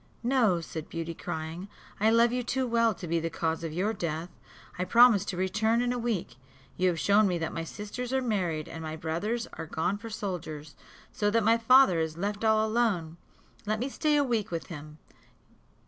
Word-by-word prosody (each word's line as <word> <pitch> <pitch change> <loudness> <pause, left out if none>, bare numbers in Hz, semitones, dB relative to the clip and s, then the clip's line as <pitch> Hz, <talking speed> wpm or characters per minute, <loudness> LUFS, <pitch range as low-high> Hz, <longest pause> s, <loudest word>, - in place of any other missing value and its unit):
"No," 230 -8 +2
said 160 -1 -7
Beauty, 165 0 -4
crying, 160 +3 -5 0.3
"I 215 +2 +4
love 230 +1 +4
you 250 +1 -1
too 260 +2 -1
well 230 -2 +2
to 180 - -8
be 165 +1 +1
the 165 +1 -2
cause 165 0 -2
of 165 - -3
your 190 +7 0
death; 170 -3 -3 0.5
I - - +1
promise 230 +1 +6
to 185 - -4
return 215 +5 +1
in 245 0 +1
a 245 - -3
week. 205 - -3 0.4
You 185 - +1
have 170 -2 0
shown 205 +6 +4
me 180 -2 0
that 165 -1 -3
my 165 - -3
sisters 210 +8 -6
are 265 - +2
married, 185 -11 -1
and 165 - -8
my 155 0 -5
brothers 175 +9 -2
are - - -6
gone 175 +6 -1
for 230 +1 -8
soldiers, 165 -8 -5 0.4
so 205 - 0
that 225 +1 +2
my 225 +2 +4
father 240 -6 +6
is 160 0 -2
left 205 +4 -3
all 220 0 +3
alone. 205 -8 0 0.5
Let 215 +1 +1
me 255 +4 -2
stay 300 +2 +1
a 290 - +4
week 230 -5 -1
with 165 -2 -5
him." 150 0 -10
200 Hz, 205 wpm, -28 LUFS, 165-230 Hz, 0.5 s, promise